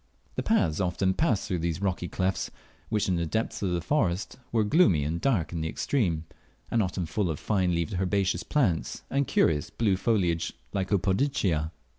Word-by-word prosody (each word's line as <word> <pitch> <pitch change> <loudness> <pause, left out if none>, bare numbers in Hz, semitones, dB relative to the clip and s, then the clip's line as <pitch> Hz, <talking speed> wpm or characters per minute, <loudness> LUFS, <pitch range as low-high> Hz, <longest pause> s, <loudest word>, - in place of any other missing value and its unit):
The - - -2
paths 80 -1 +2
often 95 +1 +1
passed 120 - +1
through 90 - -1
these 85 0 -1
rocky 95 -3 -1
clefts, 95 0 -1 0.4
which 105 -1 +1
in 90 -2 +1
the 85 - 0
depths 110 +5 -2
of 100 - 0
the 85 -1 0
forest 95 - 0 0.2
were 115 -2 +3
gloomy 105 - +4
and 80 +3 -2
dark 95 - +1
in 85 - -2
the 80 - -1
extreme, 85 - 0 0.5
and 115 - +3
often 90 -2 -1
full 90 +4 -1
of 80 - -3
fine 95 -4 +1
leaved 85 0 -1
herbaceous 95 -1 +1
plants 105 - 0
and 140 -1 +1
curious 75 -3 +2
blue 105 -5 +1
foliaged 90 -6 +1 0.2
Lycopodiaceae. 95 - +1
95 Hz, 175 wpm, -28 LUFS, 85-105 Hz, 0.5 s, gloomy